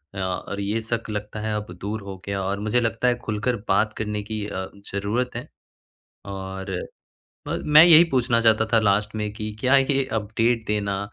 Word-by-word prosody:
अ - - -4
और 95 +2 -3
ये 105 +3 -1
शक 115 0 -3
लगता 105 0 -4
है 110 0 -2
अब 105 -3 -5
दूर 105 +2 -3
हो 100 -1 -8
गया 100 -1 -2
और 100 +1 -2
मुझे 105 +4 +1
लगता 115 +1 0
है 125 - +3
खुलकर 110 +3 -1
बात 105 +3 +2
करने 105 -1 -2
की 110 0 -4
अ, 95 -2 -4 0.3
ज़रूरत 105 +5 -1
है। 120 - -5 0.8
और 95 -1 -6 0.8
ब - - -2
मैं 150 +1 +8
यही 170 -1 +8
पूछना 120 -3 +2
चाहता 110 -1 +3
था 115 - +6
लास्ट 105 +1 +1
में 105 -1 -2
कि 110 -1 -4
क्या 130 +3 +4
ये 135 0 +2
अपडेट 115 +2 0
देना 100 -2 -1
105 Hz, 190 wpm, -24 LUFS, 100-115 Hz, 0.8 s, मैं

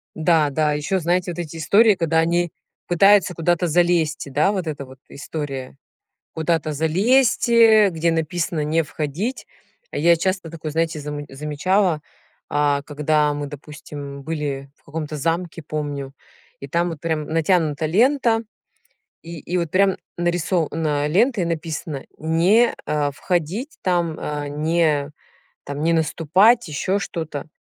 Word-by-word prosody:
Да, 160 -2 +3
да, 150 +2 +1
а - - +1
ещё, 170 +6 -1
знаете, 175 +2 0
вот 175 - -7
эти 165 -1 -6
истории, 205 +6 +4
когда 165 -1 +1
они 170 +1 +1 0.4
пытаются 190 +1 +4
куда-то 175 +1 +1
залезть, 170 -3 +1
и - - -8
да, 155 +9 +2
вот 185 -3 -2
эта 145 -3 -5
вот 130 0 -14
история. 140 -3 -6 0.6
Куда-то 160 -1 -1
залезть, 225 - +2
э, 220 -3 +6
где 165 0 0
написано: 165 -1 -1
"Не 160 +2 +1
входить". 155 - -4 0.4
А - - -4
я 170 +2 +5
часто 185 -1 -2
такое, 160 -2 -6
знаете, 160 -1 -1
заму 145 0 -6
замечала, 150 +5 0 0.5
а 145 -1 +1
когда 150 0 +1
мы, 145 0 -4
допустим, 145 -1 -9
были 140 -3 -4
в - - -36
каком-то 155 0 -5
замке, 165 +2 -2
помню. 145 -2 -5 0.5
И 140 - -7
там 170 +4 0
вот 160 - -7
прям 160 -2 -1
натянута 160 -2 +1
лента, 230 - +3 0.8
и 165 -1 -8
и 180 +4 -3
вот 170 -3 -2
прям 195 0 +3 0.2
нарисо 175 -1 0
на, 150 -2 0
лента 215 - +2
и 175 - 0
написано: 160 -3 -4
"Не, 175 +9 +3
а, 150 -1 0
входить" 180 - -3
там, 170 -3 0
а, 145 -1 -4
"Не 150 -1 0 0.6
наступать", 165 - +3
ещё 185 +7 -1
что-то. 160 -5 -5
160 Hz, 145 wpm, -21 LUFS, 150-175 Hz, 0.8 s, э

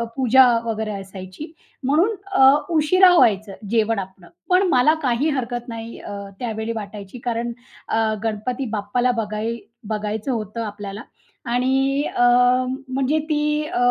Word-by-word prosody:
पूजा 260 0 +5 0.2
वगैरे 220 -1 -2
असायची. 190 - -9 0.3
म्हणून 340 +11 +2 0.2
अ, 265 -7 +7 0.3
उशिरा 360 +4 +5
व्हायचं 205 - +3 0.2
जेवण 225 -1 +1
आपलं. 185 -2 -9 0.2
पण 365 +1 +4
मला 260 +2 +4
काही 255 +5 +1
हरकत 240 0 -4
नाही 230 0 -7
अ, - - -9 0.3
त्यावेळी 225 -2 -3
वाटायची. 205 +1 -8
कारण 235 0 -1 0.4
अ, 225 -1 +1
गणपती 230 +4 -2
बाप्पाला 225 +4 0
बघाय 215 +2 -3 0.3
बघायचं 215 +3 -3
होतं 225 0 -4
आपल्याला 205 -1 -6 0.5
आणि 270 +3 +1
अ, 245 - +3 0.6
म्हणजे 270 +3 0
ती 300 0 +1
अ, 360 - -4
235 Hz, 130 wpm, -21 LUFS, 215-270 Hz, 0.6 s, अ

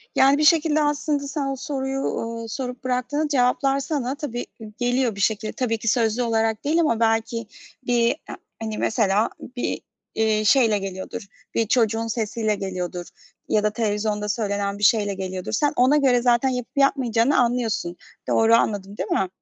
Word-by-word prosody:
Yani, 275 +2 +5
bir 305 - +1
şekilde, 310 -1 +4
aslında, 295 -1 -1
sen 280 -1 -2
o 275 - -2
soruyu, 270 -1 -3
uuu, 230 -3 -3
sorup 250 0 -5
bıraktığında 255 +4 -1
cevaplar 270 0 +2
sana 275 -2 -2
tabii 245 -5 -5
i 220 -1 -9
geliyor 245 -2 0
bir 200 - -5
şekilde. 215 +1 0
Tabii 240 -4 -1
ki 230 +1 -7
sözlü 230 +1 +2
olarak 225 -1 0
değil 310 +4 +1
ama 230 -8 +1
belki 225 0 0 0.4
bir 235 -1 +3 0.2
a - - -5 0.3
hani, 220 -1 -4
mesela, 215 -1 +2
ı - - -4 0.3
bir, 245 - -2 0.3
eee, 220 -1 +1
şeyle 225 -2 +4
geliyordur, 195 +2 -6 0.3
bir 225 -2 +1
çocuğun 225 -1 +1
sesiyle 220 -1 -1
geliyordur 180 -2 -4 0.4
ya 210 - +2
da 210 - +3
televizyonda 210 -1 -1
söylenen 200 -2 -1
bir 205 - -7
şeyle 205 -1 +3
geliyordur. 185 -1 -5
Sen 290 +6 +1
ona 260 +4 +4
göre 260 -4 +3
zaten 245 +2 +3
yapıp 250 +1 -5
yapmayacağını 265 -2 +3
anlıyorsun. 235 -8 0 0.3
Doğru 225 0 +4
anladım 205 -2 -1
değil 185 - -3
mi? 190 - +1
230 Hz, 170 wpm, -23 LUFS, 215-265 Hz, 0.4 s, Yani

